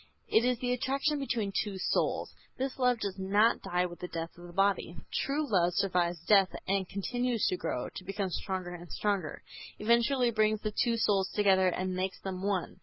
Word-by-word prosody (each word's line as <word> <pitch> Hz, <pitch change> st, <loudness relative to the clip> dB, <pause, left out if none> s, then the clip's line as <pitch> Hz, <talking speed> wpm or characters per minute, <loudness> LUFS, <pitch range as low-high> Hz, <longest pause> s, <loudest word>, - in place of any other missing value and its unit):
It 220 Hz, -, +4 dB
is 250 Hz, 0 st, +2 dB
the 245 Hz, +1 st, -1 dB
attraction 275 Hz, +4 st, 0 dB
between 230 Hz, -7 st, -1 dB
two 200 Hz, 0 st, -2 dB
souls. 185 Hz, -, 0 dB, 0.2 s
This 265 Hz, 0 st, -3 dB
love 250 Hz, -2 st, +3 dB
does 200 Hz, -2 st, -4 dB
not 205 Hz, +4 st, +3 dB
die 180 Hz, -1 st, 0 dB
with 175 Hz, -1 st, -7 dB
the 180 Hz, -, -5 dB
death 165 Hz, -1 st, -5 dB
of 175 Hz, 0 st, -11 dB
the -, -, -11 dB
body. 195 Hz, -2 st, +1 dB, 0.2 s
True 290 Hz, +2 st, 0 dB
love 180 Hz, -6 st, +2 dB
survives 175 Hz, -3 st, 0 dB
death 195 Hz, -3 st, +5 dB, 0.2 s
and 195 Hz, -1 st, 0 dB
continues 245 Hz, +3 st, -1 dB
to -, -, 0 dB
grow, 125 Hz, -7 st, -3 dB
to -, -, -6 dB
become 195 Hz, 0 st, -3 dB
stronger 185 Hz, 0 st, -3 dB
and 175 Hz, -1 st, -10 dB
stronger. 200 Hz, -6 st, -2 dB, 0.3 s
Eventually 235 Hz, +3 st, +3 dB
it 235 Hz, -, -6 dB
brings 215 Hz, -1 st, +2 dB
the 215 Hz, -, -2 dB
two 230 Hz, +2 st, +1 dB
souls 195 Hz, -4 st, +2 dB
together 190 Hz, -3 st, +4 dB
and 185 Hz, +1 st, -1 dB
makes 185 Hz, +1 st, -2 dB
them 185 Hz, -1 st, -5 dB
one. 190 Hz, -2 st, -2 dB
195 Hz, 195 wpm, -30 LUFS, 185-230 Hz, 0.3 s, death